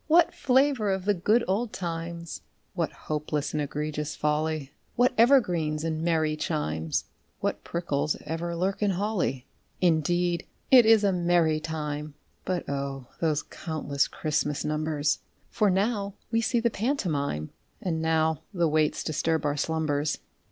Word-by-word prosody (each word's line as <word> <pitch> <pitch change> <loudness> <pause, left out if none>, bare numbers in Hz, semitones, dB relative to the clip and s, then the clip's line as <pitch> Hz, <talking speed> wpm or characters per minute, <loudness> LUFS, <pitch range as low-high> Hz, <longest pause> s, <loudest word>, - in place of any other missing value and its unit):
_) - - -41
What 330 +1 +5
flavour 260 -4 +2
of 190 -1 -1
the 205 - +4
good 210 +6 +2
old 210 +5 0
times! 170 - -5 0.3
(What - - -1
hopeless 150 -1 -3
and 150 - 0
egregious 150 +1 -3
folly!) 150 -1 -1 0.2
What 245 +1 +4
evergreens 180 - +3
and 160 -1 -1
merry 160 -2 +1
chimes! 80 - -1 0.3
(What - - -2
prickles 155 -3 -1
ever 165 +2 -3
lurk 190 +4 -1
in 205 - +3
holly!) 190 - -1 0.3
Indeed 175 +1 +2 0.2
it 250 -4 +8
is 220 -2 +6
a 200 -2 +3
merry 170 -3 +3
time; 150 -1 -4 0.3
(But 180 -2 -2
O! 140 -2 -4
those 155 -3 +1
countless 150 -4 -2
Christmas 150 -1 -1
numbers!) 150 -1 0 0.3
For 210 -3 +3
now 200 +1 0 0.2
we 230 0 +2
see 235 +1 +1
the 235 0 +1
pantomime, 165 - -1 0.3
(_And 170 -3 0
now 160 -1 +1
the 170 -2 +3
waits 155 0 +1
disturb 160 0 0
our 145 0 +1
slumbers. 150 -1 0
160 Hz, 145 wpm, -27 LUFS, 150-195 Hz, 0.3 s, it